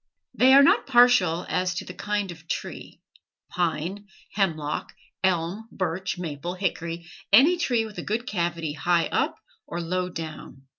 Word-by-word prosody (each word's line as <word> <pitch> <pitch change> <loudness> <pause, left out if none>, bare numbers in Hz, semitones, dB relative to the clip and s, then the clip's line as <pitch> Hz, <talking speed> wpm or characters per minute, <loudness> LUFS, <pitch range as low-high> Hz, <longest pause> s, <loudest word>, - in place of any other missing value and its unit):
They 260 +1 +5
are 280 - +9
not - - +4
partial 240 -10 +4
as 180 -1 0
to - - -4
the 180 - -8
kind 205 -1 -2
of 165 -1 -13
tree, - - -6 0.5
pine, 175 +4 -2 0.3
hemlock, 155 -7 -1 0.3
elm, 190 +4 0
birch, 185 0 -2
maple, 170 0 -5
hickory, 170 -3 -3 0.3
any 275 - +7
tree 245 -10 0
with 215 -1 -8
a - - -4
good 225 +3 -2
cavity 170 -7 -2
high 170 +3 +1
up - - +1 0.3
or 170 - -4
low 180 +2 -2
down. 155 -5 -8
180 Hz, 150 wpm, -25 LUFS, 165-210 Hz, 0.5 s, are